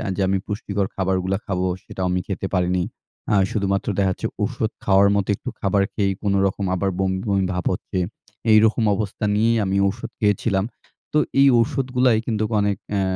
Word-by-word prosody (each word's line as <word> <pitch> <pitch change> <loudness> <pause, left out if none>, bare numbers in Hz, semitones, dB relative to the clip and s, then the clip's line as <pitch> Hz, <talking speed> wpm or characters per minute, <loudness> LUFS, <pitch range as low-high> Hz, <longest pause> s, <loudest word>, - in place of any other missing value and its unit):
যে - - -2
আমি 95 +1 +2
পুষ্টিকর 100 -2 -2
খাবারগুলা 95 0 0
খাবো 95 -1 -1 0.2
সেটাও 95 - -4
আমি 90 - +1
খেতে 95 -1 -3
পারিনি। 90 0 +1 0.5
আ - - +5 0.2
শুধুমাত্র 100 -2 -1
দেখা 95 -2 +2
যাচ্ছে - - -3 0.2
ঔষুধ - - -1
খাওয়ার 100 0 +5
মতো 100 -2 0
একটু - - -7
খাবার 100 0 +2
খেয়েই 100 -2 +1
কোনরকম 100 -1 +1
আবার 95 +2 0
বমি-বমি 95 +1 0
ভাব 90 -1 -3
হচ্ছে। - - -5 0.5
এইরকম 110 +2 +5
অবস্থা 105 0 -3
নিয়েই 115 +2 +3
আমি 95 +1 0
ঔষুধ 105 +4 -4
খেয়েছিলাম। 105 -1 +1 0.5
তো - - +3 0.2
এই 140 - +7
ঔষুধগুলায় 125 -3 +2
কিন্তু 110 -2 -1 0.2
অনেক, 100 -1 +1
অ্যা 100 -1 +1
100 Hz, 165 wpm, -22 LUFS, 95-105 Hz, 0.5 s, এই